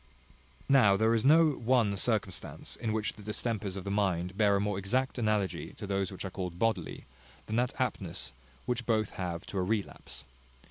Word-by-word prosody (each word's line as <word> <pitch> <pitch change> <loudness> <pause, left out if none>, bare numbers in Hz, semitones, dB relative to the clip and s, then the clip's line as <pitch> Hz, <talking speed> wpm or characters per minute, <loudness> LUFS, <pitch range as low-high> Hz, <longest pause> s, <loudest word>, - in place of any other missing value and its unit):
Now 120 -8 +6
there 110 +2 +3
is 115 - +2
no 155 +3 +6
one 120 -5 +2
circumstance 100 -3 -2
in 110 - -2
which 110 0 -1
the 105 - -13
distempers 105 -2 -3
of 95 - -5
the 100 - -3
mind 95 -3 0
bear 100 -1 +4
a - - +2
more 100 -1 -1
exact 125 +7 0
analogy 105 -4 0
to - - -7
those 95 -1 -1
which 95 - -6
are 95 - -4
called 90 -2 -4
bodily, 110 -5 -1 0.4
than 110 - -2
that 125 +1 0
aptness 95 - -2 0.3
which 120 -2 -2
both 110 -3 +1
have 90 -2 -4
to 100 - -3
a - - +2
relapse. 105 +1 -3
105 Hz, 185 wpm, -31 LUFS, 95-115 Hz, 0.4 s, Now